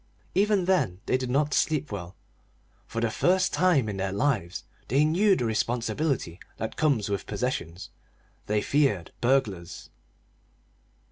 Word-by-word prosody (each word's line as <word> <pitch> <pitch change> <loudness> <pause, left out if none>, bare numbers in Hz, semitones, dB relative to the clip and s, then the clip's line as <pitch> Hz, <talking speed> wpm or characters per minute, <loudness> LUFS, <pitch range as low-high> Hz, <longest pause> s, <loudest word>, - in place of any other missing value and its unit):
Even 200 -1 +2
then 140 - +1
they - - +1
did 130 -1 -2
not 145 +3 +1
sleep 155 -3 +1
well: 90 -3 -6 0.7
for 115 - -4
the 115 -1 +1
first 185 +9 +2
time 175 -10 +3
in 100 -2 -4
their 95 0 -2
lives 100 -6 -1 0.2
they 140 +6 +3
knew 190 +6 +4
the 125 - -1
responsibility 115 - -1 0.2
that 110 - -4
comes 140 -10 +1
with 100 -2 -3
possessions; 100 -6 -3 0.6
they 105 0 +1
feared 135 - +1
burglars. 110 -9 -1
125 Hz, 135 wpm, -27 LUFS, 100-150 Hz, 0.7 s, knew